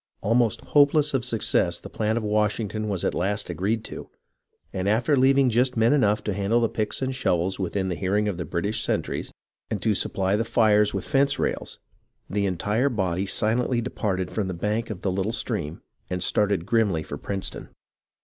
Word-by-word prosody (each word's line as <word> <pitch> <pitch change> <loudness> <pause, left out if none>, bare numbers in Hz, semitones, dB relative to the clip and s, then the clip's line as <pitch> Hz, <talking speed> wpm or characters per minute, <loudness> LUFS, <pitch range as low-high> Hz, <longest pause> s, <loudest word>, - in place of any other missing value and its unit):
Almost 115 +1 +2
hopeless 145 0 +3
of 130 -3 +1
success 110 -7 +1
the - - -10
plan 110 +1 -1
of 115 - -1
Washington 105 0 0
was 95 -4 -1
at - - +1
last 100 +1 -1
agreed 100 +7 -1
to, - - -8 0.6
and 95 +1 -1
after 120 +8 +2
leaving 135 0 +4
just 125 +2 +2
men 115 +4 +4
enough 105 -7 +2
to 105 - -1
handle 100 +4 +1
the 115 -1 +1
picks 110 +4 -2
and 130 0 -1
shovels 95 -7 0
within 95 +1 -1
the 90 - -1
hearing 100 +4 0
of 95 -4 -3
the - - -1
British 100 +5 -2
sentries - - -2 0.4
and - - -2
to 110 - +3
supply 95 0 +1
the 110 - +1
fires 105 -3 +3
with 100 - -4
fence 140 0 +2
rails, - - -2 0.5
the 100 0 0
entire 105 +8 0
body 95 -5 -1
silently 120 +5 +1
departed 100 -6 -2
from 105 -3 -2
the 95 - -4
bank 105 +6 -2
of 100 -5 -6
the 95 - 0
lit 95 +1 -1
tle 110 - -1
stream 100 -9 -4 0.3
and 90 -1 -2
started 100 -5 +1
grimly 100 -7 +1
for 70 - -7
Princeton. 100 -2 -4
105 Hz, 190 wpm, -25 LUFS, 95-115 Hz, 0.6 s, leaving